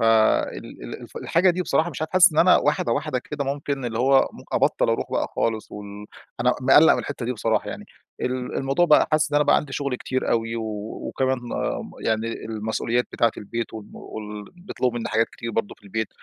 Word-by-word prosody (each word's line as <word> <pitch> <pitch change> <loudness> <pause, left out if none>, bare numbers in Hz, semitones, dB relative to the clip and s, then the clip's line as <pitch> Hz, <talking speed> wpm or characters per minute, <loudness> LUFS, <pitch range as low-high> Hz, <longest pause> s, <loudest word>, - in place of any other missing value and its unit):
فال 110 - +3
ال - - -9
الف - - -13
الحاجة 180 +3 +3
دي 180 +1 -1
بصراحة 160 +1 +1
مش 155 0 -5
عارف 160 - -4
حاسس 185 -2 +7
إن 150 - -1
أنا 180 +2 +7
واحدة 145 -5 +1
واحدة 140 0 -1
كده 145 +3 -5
ممكن 140 -1 -3
اللي 115 -1 -3 0.3
ممك - - -13
أبطل - - +2
أروح - - -1
بقى - - +1
خالص 110 -2 -1
وال 105 0 -8 0.3
أنا 125 +1 +3
مقلّق 135 +5 +7
من - - -2
الحتة 135 -4 -5
دي 125 - 0
بصراحة 110 -2 0
يعني - - -7 0.4
ال 125 0 -2
الموضوع 135 +6 +2
بقى 150 - +5
حاسس 155 -1 +2
إن - - +3
أنا 150 - +4
بقى - - +5
عندي 145 -2 -3
شغل 140 -1 -2
كتير 130 +1 -2
أوي 115 0 0
و 115 - -3 0.5
وكمان 130 -1 0 0.7
يعني 110 +1 0
المسؤوليات 110 +2 -1
بتاعة 115 -1 +2
البيت 115 +3 -5
وال 110 -2 -9
وال 105 -1 -8
بيطلبوا 150 -10 -3
مني - - -3
حاجات 110 +1 +2
كتير 115 -1 -6
برضه 115 -2 -2
في - - -28
البيت، 110 +2 -3
125 Hz, 205 wpm, -24 LUFS, 110-145 Hz, 0.7 s, حاسس